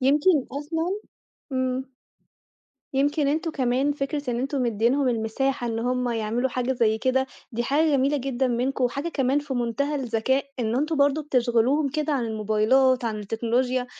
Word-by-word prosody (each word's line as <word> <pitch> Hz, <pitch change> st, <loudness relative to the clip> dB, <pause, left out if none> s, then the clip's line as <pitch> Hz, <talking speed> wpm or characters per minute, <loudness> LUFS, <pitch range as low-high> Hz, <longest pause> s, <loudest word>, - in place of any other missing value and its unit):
يمكن 290 Hz, +3 st, +3 dB
أصلًا 325 Hz, +7 st, -2 dB, 0.5 s
إمم. 260 Hz, 0 st, -1 dB, 1.1 s
يمكن 285 Hz, +2 st, +2 dB
أنتم 315 Hz, +3 st, 0 dB
كمان 265 Hz, 0 st, +1 dB
فكرة 285 Hz, -1 st, -3 dB
إن 235 Hz, -, -1 dB
أنتم 270 Hz, +1 st, -1 dB
مديينهم 240 Hz, +4 st, +2 dB
المساحة 240 Hz, +3 st, -1 dB
إن 225 Hz, -1 st, -2 dB
هُم 250 Hz, +1 st, 0 dB
يعملوا 230 Hz, +2 st, -1 dB
حاجة 250 Hz, +1 st, -1 dB
زي 220 Hz, -3 st, +1 dB
كده، 260 Hz, +2 st, +1 dB, 0.3 s
دي 235 Hz, +1 st, -1 dB
حاجة 290 Hz, +6 st, +2 dB
جميلة 275 Hz, +2 st, +2 dB
جدًا 265 Hz, -1 st, -1 dB
منكم، 250 Hz, +2 st, 0 dB
وحاجة 280 Hz, +6 st, -1 dB
كمان 270 Hz, -3 st, +1 dB
في 290 Hz, -2 st, -4 dB
منتهى 245 Hz, +5 st, -1 dB
الذكاء 265 Hz, 0 st, 0 dB, 0.2 s
إن 225 Hz, 0 st, 0 dB
أنتم 305 Hz, +4 st, 0 dB
برضه 285 Hz, +2 st, +3 dB
بتشغِلوهم 255 Hz, +1 st, +2 dB
كده 305 Hz, +2 st, -1 dB
عن 265 Hz, -4 st, 0 dB
الموبايلات، 225 Hz, +4 st, +2 dB
عن 220 Hz, -2 st, -2 dB
التكنولوجيا، 245 Hz, +4 st, 0 dB
260 Hz, 155 wpm, -25 LUFS, 240-285 Hz, 1.1 s, يمكن